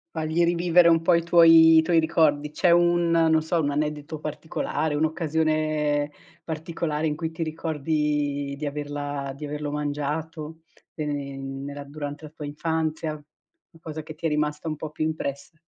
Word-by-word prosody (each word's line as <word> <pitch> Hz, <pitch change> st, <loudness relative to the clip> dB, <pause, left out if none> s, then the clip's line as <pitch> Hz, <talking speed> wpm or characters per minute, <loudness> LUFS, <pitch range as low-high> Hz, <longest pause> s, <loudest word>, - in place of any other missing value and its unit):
Fagli 160 Hz, +2 st, +1 dB
rivivere 170 Hz, 0 st, +4 dB
un 165 Hz, -1 st, +4 dB
po' 170 Hz, +1 st, +4 dB
i 170 Hz, -, +1 dB
tuoi 165 Hz, -1 st, +7 dB
i -, -, +8 dB
tuoi 165 Hz, 0 st, +3 dB
ricordi. 150 Hz, -2 st, +2 dB
C'è 175 Hz, -, +2 dB
un 175 Hz, 0 st, +4 dB
non 160 Hz, -1 st, +4 dB
so 165 Hz, +2 st, 0 dB
un 145 Hz, -2 st, 0 dB
aneddoto 150 Hz, +1 st, -3 dB
particolare, 155 Hz, 0 st, -3 dB
un'occasione 155 Hz, -1 st, 0 dB, 0.3 s
particolare 160 Hz, -1 st, -3 dB
in 150 Hz, -, -1 dB
cui 160 Hz, 0 st, -4 dB
ti 160 Hz, -, -8 dB
ricordi 150 Hz, -3 st, -1 dB
di 150 Hz, +1 st, -4 dB
averla 145 Hz, -1 st, -4 dB
di 150 Hz, -, -10 dB
averlo 150 Hz, 0 st, -4 dB
mangiato, 150 Hz, +2 st, -4 dB, 0.3 s
ehm, 140 Hz, -2 st, -5 dB
nella 145 Hz, 0 st, -6 dB
durante 145 Hz, +1 st, -7 dB
la 150 Hz, -, -9 dB
tua 150 Hz, -1 st, -9 dB
infanzia, 155 Hz, +1 st, -2 dB, 0.5 s
qualcosa 160 Hz, -2 st, -8 dB
che 155 Hz, 0 st, -9 dB
ti 165 Hz, +1 st, -3 dB
è -, -, 0 dB
rimasta 150 Hz, +1 st, -1 dB
un 155 Hz, -, -2 dB
po' 155 Hz, 0 st, -7 dB
più 155 Hz, -, -3 dB
impressa? 155 Hz, 0 st, -4 dB
155 Hz, 160 wpm, -25 LUFS, 145-160 Hz, 0.5 s, i